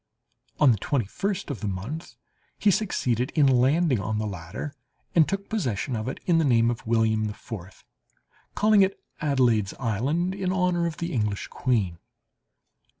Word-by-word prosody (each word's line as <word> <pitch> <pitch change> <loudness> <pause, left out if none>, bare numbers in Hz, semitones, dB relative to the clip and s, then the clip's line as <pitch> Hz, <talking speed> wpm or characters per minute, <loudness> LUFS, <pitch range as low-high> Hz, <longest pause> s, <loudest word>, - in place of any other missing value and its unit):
On 145 -4 +6
the 110 - 0
twenty 125 +1 0
first 195 - -3
of 135 - -5
the 105 - -3
month 105 - -5 0.4
he 205 - +4
succeeded 130 - 0
in 150 -3 +5
landing 135 +2 +3
on 110 +2 -2
the 110 - -1
latter, 100 - -6 0.4
and 160 -3 +4
took 200 0 -3
possession 130 - -2
of 110 +1 -3
it 130 - -4
in 170 -2 +3
the - - +3
name 120 -4 +4
of 115 - -7
William 110 -1 +2
IV, 105 -3 -9 0.7
calling 210 -1 +5
it 195 0 +2 0.2
Adelaide's 125 -9 +2
Island, 135 - 0
in 190 -2 -2
honour 180 -2 +1
of 160 - -5
the 170 0 -3
English 105 -4 -1
queen. 100 -10 0
130 Hz, 160 wpm, -26 LUFS, 110-170 Hz, 0.7 s, On